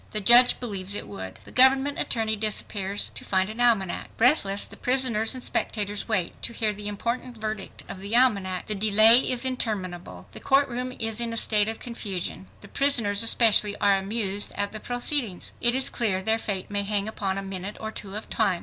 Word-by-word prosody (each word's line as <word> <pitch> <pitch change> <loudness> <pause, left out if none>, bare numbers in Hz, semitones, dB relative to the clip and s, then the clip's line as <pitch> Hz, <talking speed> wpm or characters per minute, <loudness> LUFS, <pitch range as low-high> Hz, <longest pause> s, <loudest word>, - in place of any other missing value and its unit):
The 215 - +1
judge 240 +4 +6
believes 200 -5 -4
it - - -4
would. 95 -2 -8
The - - -12
government 270 +2 +4
attorney 220 -2 -1
disappears 205 -2 -1
to - - -6
find 190 +1 0
an 230 +3 -6
almanac. 215 -7 +1
Breathless, 225 -6 +2
the - - -11
prisoners 250 -3 0
and 255 - -7
spectators 205 -1 -3
wait 185 -6 -2
to 235 - -2
hear 220 -2 -1
the 205 0 -7
important 235 +4 -4
verdict 215 -2 -6
of 185 - -8
the 200 +4 -2
almanac. 200 -7 +2
The 215 - 0
delay 215 +3 +7
is 255 -1 0
interminable. 205 -9 -4
The - - -8
court 280 +1 +2
room 250 +1 -4
is 225 0 -2
in 235 -1 -1
a - - -3
state 210 -2 +2
of 225 0 -4
confusion. 195 - -5
The - - -12
prisoners, 230 -8 +1
especially, 225 -3 +3
are 200 -1 +3
amused 200 0 -1
at 205 0 -2
the 215 - -7
proceedings. 245 -4 -1
It 240 +1 +3
is 265 0 +3
clear 195 -6 -1
their 220 +2 0
fate 200 -3 -4
may 205 0 0
hang 200 0 -1
upon 195 -3 -3
a 195 - -4
minute 195 +1 -6
or 220 0 -6
two 200 -2 -9
of 215 - -6
time. 195 -6 0
215 Hz, 200 wpm, -25 LUFS, 200-240 Hz, -, delay